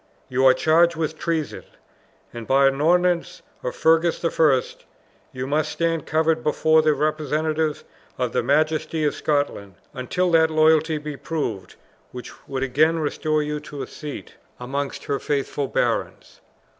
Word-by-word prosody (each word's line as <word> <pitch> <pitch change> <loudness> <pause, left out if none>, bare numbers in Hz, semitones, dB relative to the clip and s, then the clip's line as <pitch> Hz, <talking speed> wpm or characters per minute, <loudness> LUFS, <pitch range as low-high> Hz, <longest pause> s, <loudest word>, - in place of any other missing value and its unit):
you 130 +1 0
are 130 - +7
charged 170 +2 +3
with 160 -1 -2
treason; 160 -1 -3 0.7
and, 115 -2 -8
by 135 +1 +4
an 135 +1 +1
ordinance 175 +2 +1 0.2
of - - -4
Fergus 165 +1 +3
the 165 - -1
First, 140 -6 +1 0.5
you 130 0 -5
must 150 +2 0
stand 165 -2 -1
covered 160 0 +1
before 155 +1 +3
the 155 -1 +2
representative 155 +1 -1 0.3
of 125 -2 -1
the - - 0
majesty 155 +4 0
of 150 - +1
Scotland 145 - -2 0.2
until 175 +8 -1
that 160 -1 +4
loyalty 155 0 +3
be 150 0 -6
proved, 135 - -4 0.4
which 125 0 -8 0.2
would 135 -1 -3
again 155 +5 +2
restore 155 0 -1
you 150 0 -3
to 145 -2 -8
a - - -5
seat 150 -2 -8 0.3
amongst 135 +3 -4
her 140 - -2
faithful 140 -1 -2
barons." - - -2
155 Hz, 150 wpm, -23 LUFS, 140-160 Hz, 0.7 s, are